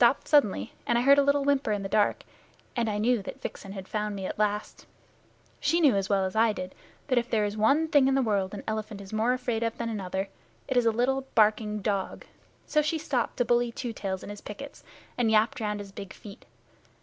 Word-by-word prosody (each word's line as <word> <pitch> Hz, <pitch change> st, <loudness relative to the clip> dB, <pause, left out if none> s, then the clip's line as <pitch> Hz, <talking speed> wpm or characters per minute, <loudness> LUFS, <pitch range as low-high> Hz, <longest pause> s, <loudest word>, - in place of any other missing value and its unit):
Then 240 Hz, -, +9 dB
he 235 Hz, -, +4 dB
stopped -, -, -23 dB
suddenly, 210 Hz, -, +2 dB
and 235 Hz, -, +3 dB
I -, -, +2 dB
heard 280 Hz, +2 st, +6 dB
a -, -, +6 dB
little 280 Hz, 0 st, +2 dB
whimper 280 Hz, -4 st, +1 dB
in 205 Hz, -1 st, -1 dB
the -, -, -2 dB
dark, 210 Hz, +1 st, +1 dB, 0.5 s
and 235 Hz, -3 st, 0 dB
knew 240 Hz, -1 st, +2 dB
that -, -, -8 dB
Vixen 195 Hz, -1 st, -7 dB
had 190 Hz, -2 st, -8 dB
found 210 Hz, -1 st, -2 dB
me 190 Hz, -1 st, -5 dB
at -, -, -5 dB
last. 210 Hz, 0 st, -2 dB, 0.7 s
She 315 Hz, +4 st, +2 dB
knew 285 Hz, -9 st, +5 dB
as 195 Hz, -1 st, -1 dB
well 195 Hz, -2 st, +2 dB
as 185 Hz, -, -4 dB
I 220 Hz, 0 st, +4 dB
did 185 Hz, -2 st, -6 dB, 0.3 s
that 255 Hz, -3 st, +2 dB
if 240 Hz, +1 st, -5 dB
there 215 Hz, -3 st, +2 dB
is 205 Hz, 0 st, -3 dB
one 275 Hz, +10 st, +3 dB
thing 285 Hz, -4 st, +4 dB
in 270 Hz, -, +3 dB
the 270 Hz, -, +3 dB
world 200 Hz, -4 st, +1 dB
the 200 Hz, 0 st, -8 dB
elephant 215 Hz, -1 st, -3 dB
is 200 Hz, +1 st, -10 dB
more 225 Hz, +3 st, +2 dB
afraid 245 Hz, -3 st, -2 dB
of 230 Hz, 0 st, -1 dB
than 235 Hz, -1 st, -3 dB
another 195 Hz, -2 st, -3 dB, 0.4 s
it 260 Hz, -, -2 dB
is 245 Hz, -2 st, +4 dB
a -, -, +5 dB
little 265 Hz, +4 st, 0 dB
barking 215 Hz, -1 st, +2 dB
dog. 200 Hz, -2 st, -2 dB, 0.4 s
So 305 Hz, -, +2 dB
she 305 Hz, +2 st, 0 dB
stopped 280 Hz, -7 st, -2 dB
to 245 Hz, -, +2 dB
bully 240 Hz, 0 st, +2 dB
Two 235 Hz, 0 st, -5 dB
Tails 190 Hz, -3 st, -4 dB
in -, -, -7 dB
his 205 Hz, -, -9 dB
pickets, 275 Hz, +7 st, -9 dB, 0.4 s
and 235 Hz, -2 st, +3 dB
yapped 220 Hz, +2 st, +3 dB
round 210 Hz, -2 st, -2 dB
his 200 Hz, -1 st, -8 dB
big 195 Hz, -1 st, -8 dB
feet. 200 Hz, -2 st, -13 dB
220 Hz, 240 wpm, -28 LUFS, 205-250 Hz, 0.7 s, Then